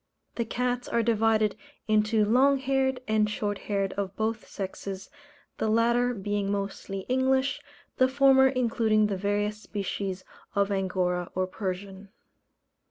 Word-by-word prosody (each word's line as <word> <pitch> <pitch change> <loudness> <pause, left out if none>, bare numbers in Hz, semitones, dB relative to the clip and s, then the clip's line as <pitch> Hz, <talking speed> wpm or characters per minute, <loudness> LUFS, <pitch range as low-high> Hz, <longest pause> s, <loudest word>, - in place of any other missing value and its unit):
The 235 - -2
cats 245 +1 -2
are 235 - +1
divided 220 -1 +2 0.3
into 215 0 +3
long 265 +6 +4
haired 265 -1 0
and 215 -1 +2
short 205 -1 -2
haired 195 -2 -2
of 195 -1 -4
both 220 0 -2
sexes, 195 0 -6 0.5
the - - 0
latter 235 +2 +2
being 205 0 -2
mostly 195 -1 -3
English, 260 +4 +1 0.4
the 255 - +5
former 265 0 +5
including 230 -4 +2
the 205 -2 -1
various 205 +2 -1
species 195 -2 -4 0.3
of 200 0 +2
Angora 180 -2 -1
or 185 0 +1
Persian. 190 +1 -5
215 Hz, 130 wpm, -27 LUFS, 195-245 Hz, 0.5 s, the